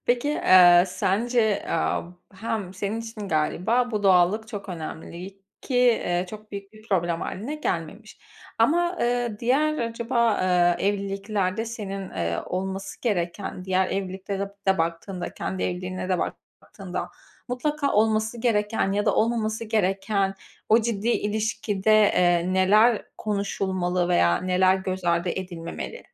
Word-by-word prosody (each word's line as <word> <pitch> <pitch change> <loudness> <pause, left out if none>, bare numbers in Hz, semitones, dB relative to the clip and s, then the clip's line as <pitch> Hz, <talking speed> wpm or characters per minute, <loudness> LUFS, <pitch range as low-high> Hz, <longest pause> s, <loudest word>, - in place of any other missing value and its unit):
Peki, 250 +5 +1
ııı, 175 -1 +8
sence, 220 +4 +1
aaa, 165 - 0 0.3
hem 200 -2 -4
senin 205 +4 -3
için 225 -3 -7
galiba 205 +10 +1
bu 210 -2 -2
doğallık 195 +3 +3
çok 205 -4 -7
önemli 175 +3 -7 0.2
ki, 250 -3 +2
ııı, 175 +1 0
çok 215 +2 -11
büyük 200 0 -7
bir 215 0 -16
problem 175 -3 0
hâline 230 +10 -4
gelmemiş 210 - -4 0.4
ama, 345 +9 +2
ııı, 240 -3 0
diğer 300 +7 +1
acaba, 235 0 +1
ııı, 175 -1 +3
evliliklerde 200 +1 -1
senin, 195 -4 -6
ııı, 85 0 -2
olması 190 +1 -4
gereken 185 -3 -2
diğer 190 0 +1
evliliklere 195 0 -3 0.3
de 190 -1 +3
baktığında 170 +3 -3
kendi 190 - -4
evliliğine 185 +1 -3
de 185 - +1 0.4
baktığında - - -6 0.4
mutlaka 285 +3 -1
olması 220 +2 +1
gereken 210 -4 +1
ya 205 +1 0
da - - +3
olmaması 220 -1 0
gereken 195 -2 0 0.3
o 225 +2 +6
ciddi 225 -1 -2
ilişkide, 215 -2 0
eee, 180 -3 +3
neler 210 +5 +4 0.2
konuşulmalı 190 -3 -1
veya 85 - +3
neler 185 +1 +3
göz 190 -1 -4
ardı 170 +1 +1
edilmemeli? 175 -2 -5
200 Hz, 130 wpm, -25 LUFS, 185-225 Hz, 0.4 s, ııı